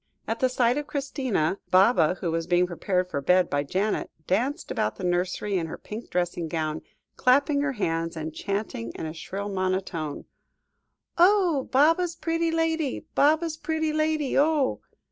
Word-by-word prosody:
At 225 - -3
sight 250 +1 +2
of 295 - -6
Christina, 260 - -1
Baba, 185 -3 +4
who 170 - -1
was 165 0 -2
being 180 0 +3
prepared 180 +1 -1
for 140 - -2
bed 180 +5 +3
by 145 - +1
Janet, 190 +9 -1 0.2
danced 250 +10 -1
about 105 - -1
the - - -9
nursery 180 +2 0
in 165 - -3
her - - -7
pink 220 +3 -8
dressing 175 -1 -1
gown, 155 -1 -2 0.4
clapping 280 +3 +3
her 285 -1 0
hands 165 -6 -2
and 160 0 -5
chanting 195 - -3
in - - -5
a 155 - -5
shrill 195 +5 -5
monotone 185 -5 -2 0.9
"Oh! 355 -6 +4
Baba's 330 +5 +3
pretty 330 0 -1
lady, 325 -4 -1
Baba's 315 +2 +2
pretty 315 -1 -1
lady, 310 -2 0
oh!" 290 -2 +2
210 Hz, 155 wpm, -26 LUFS, -, 0.9 s, Baba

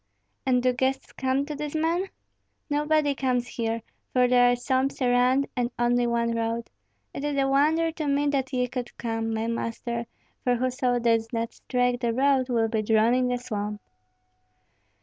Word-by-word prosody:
"And 250 -1 +3
do 255 0 +3
guests 265 +2 -1
come 265 +1 0
to 300 - -5
these 295 +1 -5
men?" 335 +4 +1 0.6
"Nobody 295 0 +2
comes 255 -2 0
here, 230 -1 -2 0.3
for 250 -1 +4
there 245 0 +5
are - - +2
swamps 260 +2 0
around, 250 +2 +3
and 245 -2 0
only 240 0 +2
one 235 0 +1
road. 230 0 -2 0.4
It 275 - -5
is 290 -1 -1
a 270 0 +2
wonder 310 +4 +3
to 310 -2 -4
me 285 +1 +2
that 270 -2 -1
ye 250 -1 0
could 245 -1 -6
come, 225 -1 -2
my 220 0 -1
master; 230 0 -3 0.4
for 245 -1 +2
whoso 250 0 0
does 230 -1 +1
not 230 -1 -2
strike 245 -1 0
the 235 -2 0
road, 265 0 +2
will 230 -2 +2
be 220 -1 0
drawn 220 +2 +3
in 255 0 +2
by 250 - +1
the 245 - -7
swamp." 210 -3 -3
250 Hz, 180 wpm, -26 LUFS, 235-275 Hz, 0.6 s, there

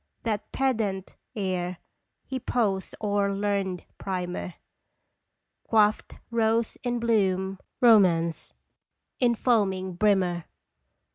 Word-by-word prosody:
That 215 -2 -2
pedant 220 -8 -1 0.2
ere 185 -3 -2 0.5
he 260 - -4
posed 205 -6 -1
o'er 205 -1 +1
learned 195 -3 -1
primer, 180 -2 -4 1.1
Quaffed 215 -1 +2 0.2
Rose 225 0 +1
In 245 -1 0
Bloom 195 -4 +1 0.2
romance 175 -9 +4 0.7
in 240 -2 +3
foaming 190 -6 +1
brimmer! 180 -3 +1
200 Hz, 85 wpm, -27 LUFS, 185-225 Hz, 1.1 s, romance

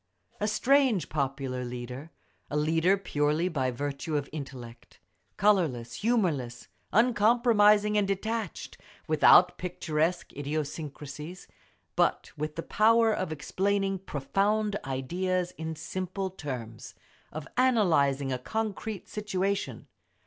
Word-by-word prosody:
A 210 - 0
strange 250 - +3
popular 135 -3 -2
leader—a 125 +5 -8
leader 165 +5 +3
purely 155 -2 0
by 135 -6 0
virtue 145 +4 -3
of 145 -1 -3
intellect; 130 -6 -9 0.4
colourless, 165 - +2
humourless, 165 - 0 0.2
uncompromising 210 -2 +4
and 200 - +1
detached, 215 0 -3 0.3
without 160 +3 +6
picturesque 170 -1 -1
idiosyncrasies—but 150 +2 -4
with 150 +1 -4
the 165 - -4
power 225 +1 +4
of 185 -5 -2
explaining 195 +5 -1
profound 200 +7 0
ideas 175 +7 -1
in 160 -2 -5
simple 185 +4 -4
terms, 125 - -7 0.4
of 155 -1 -7
analysing 155 - +3
a 125 - -2
concrete 215 - -4
situation. 200 -1 -2
170 Hz, 100 wpm, -28 LUFS, 140-205 Hz, 0.4 s, without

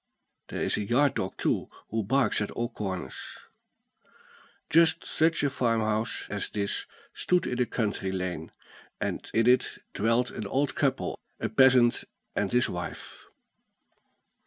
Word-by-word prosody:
There - - -3
is - - +1
a 105 - -1
yard 130 +7 +3
dog 95 - -3
too, - - 0 0.2
who 110 +1 0
barks 115 0 +2
at 105 - -1
all 120 0 -3
corners. 95 -6 -5 1.3
Just 165 +1 +4
such 160 -1 +2
a 145 - +3
farmhouse 115 -3 0
as 100 0 -2
this 100 -1 -2 0.3
stood 180 -1 +1
in 125 0 -1
a 125 - +2
country 105 -4 -1
lane; 90 -4 -4 0.5
and - - -3
in 115 0 +2
it 125 +1 +3 0.2
dwelt 115 +3 +1
an 105 - -5
old 140 +6 0
couple, - - 0 0.2
a - - -1
peasant 130 -3 +5 0.3
and 100 -2 0
his 125 0 +3
wife. 90 0 -7
115 Hz, 140 wpm, -28 LUFS, 100-130 Hz, 1.3 s, peasant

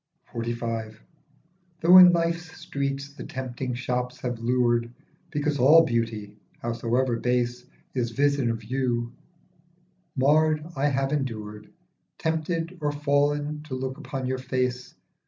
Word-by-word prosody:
49 120 0 -3
XLV. 110 -1 -4 0.8
THOUGH 175 +2 +8
in 180 -1 +10
life's 170 -1 -1
streets 140 0 -3
the - - -8
tempting 130 -1 -4
shops 125 0 -3
have 120 -2 -3
lured 120 0 +1 0.4
Because 145 -1 -1
all 155 +6 +7
beauty, 115 -4 -2 0.2
howsoever 120 +1 0
base, 125 0 -1 0.3
Is 120 -3 -1
vision 140 0 +1
of 115 -1 -3
you, 120 0 -1 1.0
marred, 155 +3 +3
I 140 +1 +1
have 135 0 0
endured, 110 -7 -4 0.5
Tempted 165 +2 -2
or 145 -1 +1
fall'n, 145 +1 0
to 130 - -4
look 130 +2 -4
upon 135 -3 -5
your 130 0 -2
face. 125 -1 -2
130 Hz, 125 wpm, -26 LUFS, 120-145 Hz, 1.0 s, in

